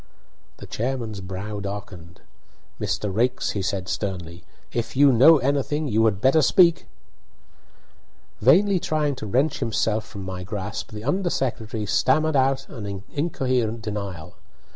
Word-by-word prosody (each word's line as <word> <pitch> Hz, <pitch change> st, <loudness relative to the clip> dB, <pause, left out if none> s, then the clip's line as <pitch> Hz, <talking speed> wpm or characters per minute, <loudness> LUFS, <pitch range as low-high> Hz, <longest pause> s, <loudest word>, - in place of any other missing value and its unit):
The -, -, -10 dB
chairman's 115 Hz, -4 st, -3 dB
brow 95 Hz, +3 st, -5 dB
darkened. 100 Hz, -3 st, -8 dB, 0.6 s
"Mr. 105 Hz, -2 st, -2 dB
Raikes," 120 Hz, +5 st, 0 dB
he 100 Hz, -, -3 dB
said, 95 Hz, 0 st, -2 dB
sternly, 90 Hz, -3 st, -4 dB, 0.3 s
"if 120 Hz, +1 st, -3 dB
you 140 Hz, 0 st, +7 dB
know 140 Hz, +7 st, +7 dB
anything 145 Hz, +2 st, 0 dB
you 110 Hz, -2 st, +2 dB
had 105 Hz, -3 st, +1 dB
better 135 Hz, +7 st, +4 dB
speak." 170 Hz, +2 st, +4 dB, 1.5 s
Vainly 185 Hz, -, +5 dB
trying 150 Hz, -3 st, 0 dB
to 110 Hz, -, -6 dB
wrench 135 Hz, +9 st, +1 dB
himself 110 Hz, 0 st, 0 dB
from 100 Hz, -1 st, -9 dB
my 95 Hz, -1 st, -6 dB
grasp, 105 Hz, +4 st, -5 dB
the 105 Hz, 0 st, -7 dB
under 180 Hz, +8 st, 0 dB
secretary 110 Hz, -6 st, -2 dB
stammered 155 Hz, +8 st, +2 dB
out 135 Hz, 0 st, +2 dB
an 100 Hz, -6 st, -7 dB
incoherent 130 Hz, -7 st, -1 dB
denial. 100 Hz, -6 st, -6 dB
110 Hz, 135 wpm, -24 LUFS, 100-135 Hz, 1.5 s, you